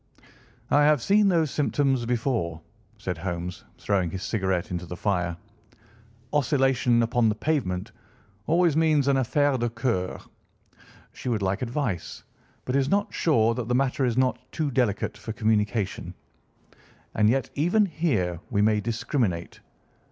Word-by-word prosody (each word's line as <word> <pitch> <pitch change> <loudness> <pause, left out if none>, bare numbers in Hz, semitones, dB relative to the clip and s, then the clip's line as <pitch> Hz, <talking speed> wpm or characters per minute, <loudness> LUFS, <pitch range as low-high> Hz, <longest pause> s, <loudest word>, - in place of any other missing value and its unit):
"I 145 - +5
have 150 -1 +4
seen 205 - +3
those 165 -6 +2
symptoms 135 -4 +1
before," 115 - -1 0.4
said 90 -5 -4
Holmes, 90 0 -5
throwing 95 -4 0
his 95 +3 -6
cigarette 95 -5 -1
into 90 0 -4
the 90 - -7
fire. 90 -4 -1 1.0
"Oscillation 135 -4 +2
upon 115 0 +2
the 105 - 0
pavement 110 -10 -1 0.6
always 170 -1 +3
means 155 -3 +3
an 140 - +4
affaire 135 +1 +1
de 120 0 0
cœur. 115 -6 -2 0.9
She - - -5
would 110 -4 0
like 95 +2 -1
advice, 120 - -3 0.4
but 130 - -1
is 140 0 +2
not 200 +3 0
sure 115 -8 +2
that 120 -1 -4
the 125 - +1
matter 135 +1 +1
is 120 -2 0
not 130 -1 +2
too 155 -3 -2
delicate 120 -5 0
for 110 - -6
communication. 105 -1 -1 1.0
And 105 -1 +3
yet 135 +3 0
even 175 +9 +2
here 130 - -1
we 105 -1 +1
may 105 0 +3
discriminate. 110 - -2
120 Hz, 145 wpm, -26 LUFS, 100-140 Hz, 1.0 s, I